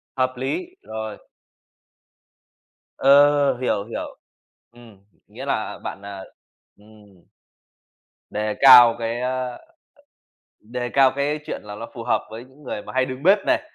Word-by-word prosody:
Hợp 130 -1 0
lý, 345 - -4
rồi. 110 -1 -7 1.8
Ờ, 145 +1 +5
hiểu, 120 -5 -1
hiểu, 115 - -7 0.5
ừm, 120 -4 -17 0.3
nghĩa - - -9
là - - -3
bạn, 100 - -6
à, 100 -1 -8 0.6
ừm, 105 -3 -20 1.1
đề 105 0 -3
cao 125 -3 +9
cái 115 +1 -3
ờ, 125 0 -3 1.0
đề 120 +3 -5
cao 135 +1 +4
cái 145 +2 -1
chuyện - - -5
là 105 -1 -9
ló 105 - -7
phù - - -7
hợp - - 0
với 115 +2 -9
những 130 +3 -21
người 105 -5 -6
mà - - -10
hay 130 0 +2
đứng 130 +1 -7
bếp 195 +5 +5
này. - - +2
125 Hz, 140 wpm, -22 LUFS, 110-135 Hz, 1.8 s, cao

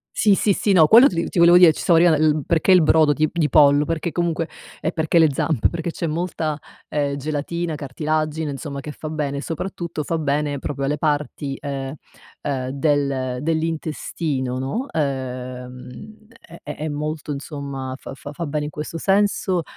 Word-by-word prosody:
Sì, 205 -2 +4
sì, 200 +1 +2
sì, 205 - +1
no 160 -3 +7
quello 240 +5 +8
ti - - -6
li 170 - -1
ti - - -3
volevo 170 +1 +7
dire, 180 -3 +8
ci - - -8
stavo 170 -2 +4
arrivando, 160 -3 +4
l - - -9
perché 170 +2 +1
il 180 -3 +7
brodo 155 -1 +4
di 155 0 +1
di 165 -3 +1
pollo, 145 0 +5
perché 165 0 -2
comunque 170 -2 -1 0.4
e 160 - -1
perché 160 +1 +1
le 160 -3 +5
zampe, 140 -2 +1
perché 170 0 -3
c'è 170 - -4
molta, 160 -2 -2 0.3
ehm, 145 -1 -1
gelatina, 155 +3 -3
cartilagine, 155 +2 -2
insomma, 140 +1 -6
che 150 +1 -7
fa 155 - -7
bene, 145 -2 -3
soprattutto 170 0 -4
fa 165 +2 -1
bene 145 -1 -1
proprio 140 0 -4
alle 150 +2 -1
parti, 145 -2 -2
uhm 135 -1 -4 0.5
uhm, 130 -3 -2
del 140 -3 0
dell'intestino, 155 -4 -2
no, 180 - -3
uhm, 130 - -5 0.2
è 170 - -13
è 150 - -7
è 155 - -4
molto 150 0 -4
insomma 140 -2 -5
fa - - -9
fa 145 +1 -9
fa 170 - -4
bene 150 0 -2
in 150 - -6
questo 150 +3 -6
senso, 195 -2 +1
150 Hz, 180 wpm, -22 LUFS, 140-165 Hz, 0.5 s, quello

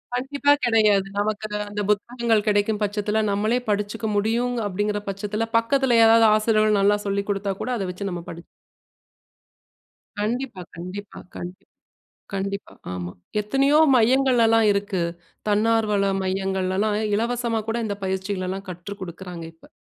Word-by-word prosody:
கண்டிப்பா 285 +3 +2
கெடையாது. 215 -4 +4
நமக்கு 215 +1 -1 0.2
அந்த 205 0 -3
புத்தகங்கள் 225 +1 +1
கெடைக்கும் 210 +1 +1
பட்சத்தில 210 +1 0
நம்மளே 215 +5 +1
படிச்சுக்க 210 +2 -1
முடியும் 235 +4 +1
அப்டிங்கிற 205 +2 -1
பட்சத்துல 210 +3 -3
பக்கத்துல 240 0 +2
யாராவது 225 0 +7
ஆசிரியர்கள் 215 -1 +3
நல்லா 205 +1 +4
சொல்லிக் 200 +1 -2
குடுத்தா 195 -1 -1
கூட - - -3
அத 195 - -2
வச்சு 200 +2 -5
நம்ம 175 -1 -5
படி 170 0 -10 1.8
கண்டிப்பா, 230 -2 -2
கண்டிப்பா, 185 +4 -8 0.2
கண்டிப்பா. 185 +3 -8 0.7
கண்டிப்பா, 195 +1 -4 0.2
ஆமா. 90 -1 -5 0.3
எத்தனையோ 275 +7 +2 0.2
மையங்கள் 255 +1 +4
எல்லாம் 225 0 +4
இருக்கு. 200 -2 -1 0.5
தன்னார்வல 210 -1 +2 0.2
மையங்கள்லலாம் 190 +2 0 0.2
இலவசமாக்கூட 230 0 -1
இந்த 205 -2 -3
பயிற்சிகளலாம் 190 0 -3
கற்றுக்குடுக்றாங்க 180 -1 -8
இப்ப. 165 - -20
210 Hz, 120 wpm, -23 LUFS, 195-225 Hz, 1.8 s, யாராவது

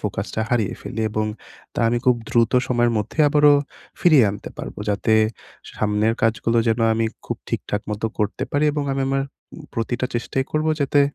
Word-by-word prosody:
ফোকাসটা 105 +1 -3
হারিয়ে 115 -5 0
ফেলি, 110 - -5
এবং 110 0 -1 0.5
তা - - -1
আমি 120 +1 +1
খুব 125 -1 +4
দ্রুত 115 -2 +2 0.2
সময়ের 120 -1 +2
মধ্যে 105 +8 -5
আবারও 145 0 +6 0.5
ফিরিয়ে 155 -9 +6
আনতে 100 - -8
পারবো। - - -7
যাতে 105 +2 +1 0.6
সামনের 105 +1 +1
কাজগুলো 115 +1 +2
যেন 115 +1 +1
আমি 115 0 +1 0.2
খুব - - -3
ঠিকঠাক 105 - -2
মতো 105 +1 -2
করতে 105 -1 -1
পারি 145 +1 +1
এবং 145 - -1
আমি 135 - 0
আমার 135 0 +1 0.3
উম 160 - -10
প্রতিটা 120 +2 -1
চেষ্টাই 125 +3 -1
করব 155 0 0
যাতে 140 +1 +3
115 Hz, 170 wpm, -22 LUFS, 110-135 Hz, 0.6 s, আবারও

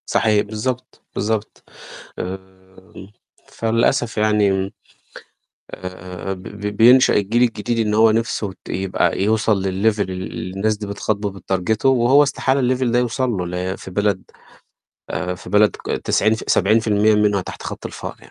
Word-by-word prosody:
صحيح 105 -2 +2
بالضبط 115 +4 -4
بالضبط. 110 +1 -2 0.6
آآ 95 +1 -4 1.1
فللأسف 115 +1 0
يعني 105 -1 +3
م 95 0 -1 1.0
آآ 90 +1 -7
ب 95 -1 -8
ب 105 +2 -10 0.2
بينشأ 125 +4 +6
الجيل 105 +4 +2
الجديد 115 -1 0
إن 105 - 0
هو 110 +1 +5
نِفْسه 115 -2 -1
ت - - -12
يبقى 95 -1 0
يوصل 110 -1 +2
للlevel 95 - -1 0.3
ال 95 -2 -1
اللي 95 0 -5
الناس 105 +2 0
دي 105 0 -6
بتخاطبه 100 0 -2
وبتتارجته، 95 +4 -1
وهو 130 +2 +5
استحالة 140 -1 +1 0.2
الlevel 130 - -1
ده 120 - +3
يوصل 125 +1 0
له 95 -6 -2
ل 90 +2 -3
في - - -9
بلد 100 0 0 0.9
آآ 90 0 -2
في 90 - -11
بلد 105 +1 +4
ك - - -15
تسعين 110 +1 +1
ف 110 - -6
70% 110 +1 +3
منها 105 -1 +2
تحت - - -9
خط - - -6
الفقر - - -8
يع - - -16
105 Hz, 155 wpm, -20 LUFS, 95-115 Hz, 1.1 s, بينشأ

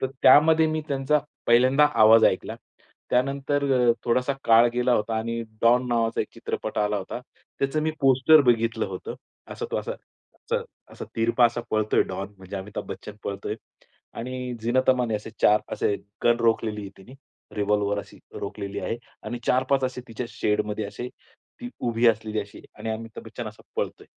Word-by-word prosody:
तर 130 - +1 0.2
त्यामध्ये 160 +4 +7
मी 155 0 -1
त्यांचा 140 +2 +2 0.3
पहिल्यांदा 130 +5 +5 0.2
आवाज 110 +1 +8
ऐकला. - - +1 0.6
त्यानंतर 140 +3 +1 0.3
अ, - - +5
थोडासा 125 +3 +1
काळ 115 +1 +6
गेला 125 0 +2
होता 110 +1 -1
आणि 115 +1 -3 0.2
डॉन 120 +2 +4
नावाचा 115 -1 +1
एक - - -2
चित्रपट - - -4
आला 105 0 +1
होता. 100 +5 -5 0.4
त्याचं 140 +3 0
मी 155 - +1
पोस्टर 135 +3 +6
बघितलं 115 -2 +2
होतं. 95 -2 -6 0.4
असं - - -5
तो - - -1
असा, - - -3 0.4
असा - - -3 0.3
असा, - - -7
तिरपा 115 +2 +3
असा 120 +1 -3
पळतोय 110 0 +2
डॉन 95 +2 -6
म्हणजे 95 +1 -8
अमिताभ 100 +2 -6
बच्चन 105 - -8
पळतोय. 100 +1 -3 0.6
आणि 125 +1 -5
झीनत 125 +3 +1
अमानने 125 -3 +1
असे 105 +1 -5
4 105 +1 +6
असे, 100 - 0 0.3
गन 120 0 +5
रोखलेली 115 -2 +1
आहे 100 - -7
तिने, 120 +7 -14 0.4
रिव्हॉल्वर 105 0 +1
अशी - - -9 0.2
रोखलेली 100 0 -5
आहे. 115 - -2 0.3
आणि 120 +3 -5
4-5 130 +1 +2
असे 130 -1 -3
तिच्या 115 +2 -5
शेडमध्ये 105 0 -1
असे, 105 +5 -6 0.5
ती 245 - -5
उभी 120 0 +1
असलेली 110 -1 0
अशी 100 0 -10 0.2
आणि 110 +1 -4
अमिताभ 115 +1 -6
बच्चन 115 +1 -7
असा 105 - -14
पळतोय, - - -3
115 Hz, 165 wpm, -25 LUFS, 105-130 Hz, 0.6 s, आवाज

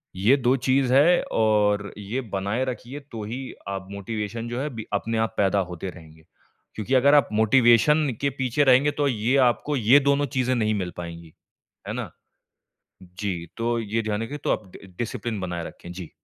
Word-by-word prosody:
ये 105 +9 +4
2 125 0 +2
चीज़ 130 -1 +3
हैं, 165 +6 +5
और 105 -2 +2
ये 105 +6 -4
बनाए 100 +7 -1
रखिए, 130 +3 -6
तो 115 -6 -9
ही 120 +5 -5 0.3
आप, 95 -1 -5
मोटिवेशन 105 +3 -4
जो 120 +1 -3
है 140 - -2
अभी, 115 -4 -7
अपने 115 +3 -1
आप - - -21
पैदा 100 0 +2
होते 90 +2 -5
रहेंगे। 80 -2 -14 0.5
क्योंकि 110 +5 -3
अगर 140 +3 +5
आप 145 - +4
मोटिवेशन 120 +6 +4
के 140 - +2
पीछे 130 +3 +2
रहेंगे, 135 +2 +5
तो 145 -1 0
ये 120 +1 0
आपको 145 +5 -1
ये 125 +5 +6
दोनों 140 +1 +2
चीज़ें 130 0 +2
नहीं 110 -2 +1
मिल 90 -3 -3
पाएँगी। 85 -2 -8 0.5
है - - -3
ना? - - -5 0.9
जी, 90 -1 -5
तो 120 0 0
ये 110 +1 -2
ध्यान 105 0 -2
रखें। 145 +6 -5
तो - - -2
आप 95 -4 -2
ड 95 -2 -15
डिसिप्लिन 115 -3 -3
बनाए 85 -2 -4
रखें। 85 - -10
जी। 90 -3 -8
115 Hz, 185 wpm, -24 LUFS, 100-130 Hz, 0.9 s, ये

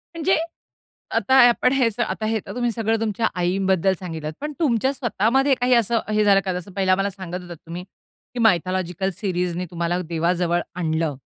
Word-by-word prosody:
म्हणजे 335 +3 +2 0.8
आता 265 - +2
आपण 255 +1 +2
हे 255 -4 +3
स 220 - -15
आता 220 -1 -1
हे 220 0 0
तर - - -8
तुम्ही 240 -1 0
सगळं 225 0 0
तुमच्या 225 0 0
आईंबद्दल 190 +1 +1
सांगितलत. 160 -4 -5
पण 300 +1 -4
तुमच्या 265 -3 +1
स्वतःमध्ये 255 +3 +1
काही 250 +1 +1
असं 235 0 +2
अ, - - -4
हे 215 0 +2
झालं 200 -1 +5
का, 185 - -1
जसं 190 +3 -12
पहिला 190 -1 +1
आम्हाला 195 +2 +2
सांगत 185 -2 -7
होतात 175 -2 -10
तुम्ही, 170 +2 -6 0.5
की 245 - -5
मायथॉलॉजिकल 185 -2 +1
सीरीजनी 180 -2 -2
तुम्हाला 175 +1 -1
देवाजवळ 175 +1 +1
आणलं. 160 -3 -1
195 Hz, 180 wpm, -22 LUFS, 175-230 Hz, 0.8 s, झालं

